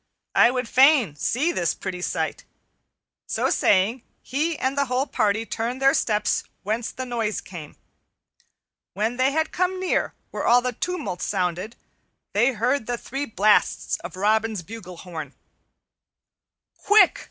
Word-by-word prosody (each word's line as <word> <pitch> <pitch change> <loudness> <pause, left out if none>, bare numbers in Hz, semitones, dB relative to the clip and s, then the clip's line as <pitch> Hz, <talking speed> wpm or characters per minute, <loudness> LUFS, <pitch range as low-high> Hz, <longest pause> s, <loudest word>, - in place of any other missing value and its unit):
I 235 - +6
would 250 -1 -2
fain 260 - +5
see 270 - 0
this 170 - 0
pretty 185 -2 -5
sight." - - -2 0.8
So - - 0
saying, 205 +6 +2 0.2
he 305 +4 -1
and 260 +1 -1
the 280 0 +1
whole 255 +1 0
party 215 -3 0
turned 235 +3 -3
their 270 0 +4
steps 210 -1 +1 0.2
whence 220 +3 -2
the 260 - -6
noise 230 -4 -2
came. 160 -5 -10 1.2
When 220 +5 -1
they 260 +2 +3
had 315 +2 0
come 370 +1 0
near 370 -1 0 0.2
where - - -4
all 245 +1 +5
the 250 0 -1
tumult 350 - -4
sounded 185 +3 -2 0.6
they 240 +6 +3
heard 235 +2 0
the 245 0 -1
three 270 +4 -4
blasts 210 0 +2
of 175 +1 -9
Robin's 215 0 +1
bugle 185 -3 -9
horn. 160 -6 -8 1.4
"Quick!" 420 +1 +4
230 Hz, 140 wpm, -24 LUFS, 200-265 Hz, 1.4 s, I